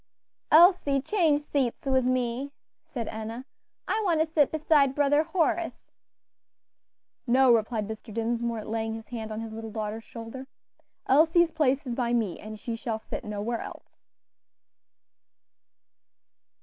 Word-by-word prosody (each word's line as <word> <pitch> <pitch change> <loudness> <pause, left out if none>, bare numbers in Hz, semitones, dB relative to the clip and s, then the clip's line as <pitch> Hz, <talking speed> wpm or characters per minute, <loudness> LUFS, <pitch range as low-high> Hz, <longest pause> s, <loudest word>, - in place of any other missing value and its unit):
"Elsie, 320 -4 +6
change 310 -1 +2
seats 275 -5 -2
with 260 -2 +2
me," 255 +2 -1 0.3
said 235 -4 -5
Enna; 225 +3 -6 0.4
"I 440 - 0
want 340 -5 +2
to 315 - +3
sit 310 -3 +2
beside 295 -3 +3
Brother 290 +1 +3
Horace." 330 +1 -1 1.4
"No," 255 +1 +5
replied 220 -2 0
Mr. 220 +1 -8
Dinsmore, 230 0 -2
laying 225 0 -2
his 225 -1 -10
hand 220 -2 -6
on 215 +1 -4
his 225 -1 -7
little 225 0 -6
daughter's 215 0 -4
shoulder, 230 +4 -9 0.6
"Elsie's 325 +4 +4
place 290 -3 +1
is 245 - -3
by 240 -1 -1
me, 220 -7 0
and 215 0 -9
she 230 +1 -4
shall 225 -1 -3
sit 220 - -7
nowhere 210 +3 -3
else." - - -11
245 Hz, 135 wpm, -27 LUFS, 225-290 Hz, 1.4 s, Elsie